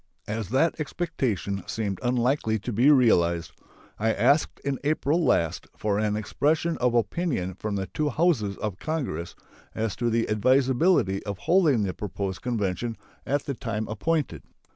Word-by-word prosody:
As 105 Hz, -2 st, -3 dB
that 150 Hz, +8 st, +2 dB
expectation 120 Hz, -, -2 dB
seemed 100 Hz, -4 st, -3 dB
unlikely 125 Hz, -2 st, +1 dB
to 110 Hz, +3 st, -5 dB
be 120 Hz, +7 st, +4 dB
realized, 85 Hz, -, +4 dB, 0.5 s
I 110 Hz, +1 st, +2 dB
asked 135 Hz, +8 st, +2 dB
in 140 Hz, -2 st, -1 dB
April 155 Hz, +2 st, +1 dB
last 85 Hz, -, +1 dB
for 105 Hz, -1 st, 0 dB
an 105 Hz, -1 st, 0 dB
expression 150 Hz, +10 st, 0 dB
of 125 Hz, -1 st, +2 dB
opinion 115 Hz, -, 0 dB
from 105 Hz, +2 st, -4 dB
the 95 Hz, -1 st, -2 dB
two 150 Hz, +9 st, -2 dB
Houses 130 Hz, -, +1 dB
of 105 Hz, -4 st, -4 dB
Congress 130 Hz, -, -3 dB, 0.4 s
as 110 Hz, -3 st, -1 dB
to 120 Hz, -1 st, 0 dB
the 115 Hz, 0 st, +1 dB
advisability 130 Hz, -, +2 dB
of 100 Hz, -2 st, -4 dB
holding 155 Hz, -, +3 dB
the 95 Hz, -2 st, -2 dB
proposed 100 Hz, -2 st, -4 dB
convention 115 Hz, -1 st, -2 dB, 0.3 s
at 145 Hz, +1 st, 0 dB
the 140 Hz, -, -2 dB
time 115 Hz, -4 st, -3 dB
appointed. 155 Hz, +6 st, -1 dB
115 Hz, 150 wpm, -26 LUFS, 100-140 Hz, 0.5 s, be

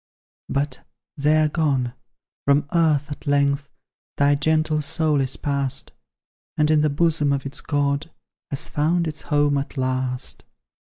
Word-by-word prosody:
But 140 Hz, -1 st, -2 dB, 0.3 s
they 150 Hz, +1 st, +3 dB
are 155 Hz, -, +4 dB
gone; 140 Hz, -6 st, 0 dB, 0.5 s
from 140 Hz, +1 st, +4 dB
earth 155 Hz, -3 st, +2 dB
at 145 Hz, -, -8 dB
length 140 Hz, 0 st, +2 dB, 0.5 s
Thy 140 Hz, 0 st, +4 dB
gentle 155 Hz, +1 st, +1 dB
soul 150 Hz, 0 st, +1 dB
is 130 Hz, 0 st, -2 dB
pass'd, 140 Hz, -2 st, -2 dB, 0.7 s
And 150 Hz, 0 st, +3 dB
in 155 Hz, -1 st, +4 dB
the 150 Hz, -, +3 dB
bosom 150 Hz, -1 st, +2 dB
of 140 Hz, -1 st, -1 dB
its 140 Hz, +2 st, -5 dB
God 145 Hz, +1 st, 0 dB, 0.4 s
Has 140 Hz, -, -2 dB
found 165 Hz, +3 st, +1 dB
its 155 Hz, -1 st, -5 dB
home 145 Hz, -1 st, +2 dB
at 140 Hz, +1 st, -6 dB
last. 130 Hz, 0 st, -1 dB
145 Hz, 145 wpm, -23 LUFS, 140-155 Hz, 0.7 s, are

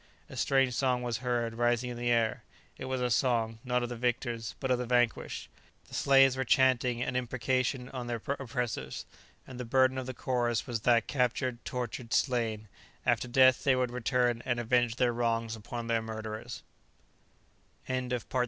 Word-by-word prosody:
A -, -, -8 dB
strange 135 Hz, -2 st, +2 dB
song 125 Hz, -1 st, +1 dB
was 120 Hz, -2 st, -1 dB
heard 120 Hz, -1 st, -1 dB
rising 120 Hz, +1 st, +1 dB
in 120 Hz, -, -6 dB
the 120 Hz, 0 st, -1 dB
air. 115 Hz, -2 st, +2 dB, 0.3 s
It -, -, -7 dB
was 130 Hz, -1 st, -2 dB
a 125 Hz, -1 st, 0 dB
song, 115 Hz, -2 st, +1 dB
not 125 Hz, -1 st, 0 dB
of 120 Hz, -, -3 dB
the 120 Hz, -, -4 dB
victors, 120 Hz, -2 st, -2 dB
but 130 Hz, -2 st, -1 dB
of 125 Hz, -, +2 dB
the 125 Hz, -, -3 dB
vanquished. 120 Hz, -1 st, 0 dB, 0.4 s
The -, -, -16 dB
slaves 135 Hz, -1 st, +5 dB
were 130 Hz, -, -1 dB
chanting 125 Hz, -1 st, +3 dB
an 130 Hz, -, -3 dB
imprecation 125 Hz, +1 st, -1 dB
on 125 Hz, -2 st, -6 dB
their 120 Hz, -1 st, -2 dB, 0.2 s
oppressors; 120 Hz, -, -3 dB, 0.4 s
and 130 Hz, -1 st, -10 dB
the -, -, -3 dB
burden 130 Hz, +2 st, +3 dB
of 130 Hz, -, -6 dB
the 130 Hz, -, -5 dB
chorus 120 Hz, -3 st, 0 dB
was 115 Hz, -3 st, -3 dB
that 120 Hz, +1 st, +4 dB
captured, 125 Hz, -2 st, -1 dB
tortured, 125 Hz, -1 st, -3 dB
slain 115 Hz, -5 st, 0 dB, 0.4 s
after 120 Hz, 0 st, +2 dB
death 130 Hz, 0 st, +5 dB
they 135 Hz, -2 st, +4 dB
would 125 Hz, -1 st, 0 dB
return 125 Hz, -1 st, +1 dB
and 120 Hz, -1 st, -1 dB
avenge 120 Hz, 0 st, +2 dB
their 120 Hz, -1 st, +2 dB
wrongs 115 Hz, -1 st, 0 dB
upon 115 Hz, +2 st, -6 dB
their 115 Hz, -1 st, +1 dB
murderers! 110 Hz, -1 st, -6 dB
120 Hz, 170 wpm, -30 LUFS, 115-130 Hz, 0.4 s, slaves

